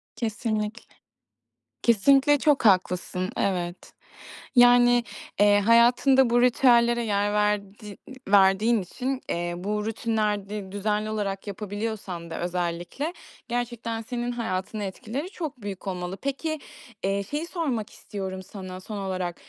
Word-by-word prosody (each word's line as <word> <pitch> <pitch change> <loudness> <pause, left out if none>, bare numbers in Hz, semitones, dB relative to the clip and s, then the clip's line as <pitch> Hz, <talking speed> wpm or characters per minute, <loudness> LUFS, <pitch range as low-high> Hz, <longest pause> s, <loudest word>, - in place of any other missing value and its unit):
Kesinlikle. 220 -1 -3 0.9
Kesinlikle 275 +6 +5
çok 290 -3 +2
haklısın. 185 -1 +2
Evet. 175 -2 -2 0.6
Yani, 245 0 +6 0.4
eee, 205 0 +6
hayatında 240 +4 +5
bu 240 +1 +3
ritüellere 240 -1 +4
yer 205 -1 0
verdiği 210 0 -1 0.3
verdiğin 200 +3 +4
için, 255 +8 -4
eee, 175 0 -2
bu 210 +3 -2
rutinleri 210 -3 -2
düzenli 210 +1 -1
olarak 205 -2 -3
yapabiliyorsan 205 -4 -5
da 165 - -5
özellikle, 175 - -3 0.3
gerçekten 235 -1 -3
senin 240 +1 -3
hayatına 215 -3 -3
etkileri 225 - -5
çok 310 - -6
büyük 200 -1 -7
olmalı. 180 0 -4
Peki, 310 +3 -2 0.4
eee, 200 +1 0
şeyi 295 - -4
sormak 270 - -2
istiyorum 190 -2 -6
sana 185 -1 -8
son 205 +2 -7
olarak. 185 -3 -3
210 Hz, 115 wpm, -26 LUFS, 195-240 Hz, 0.9 s, Yani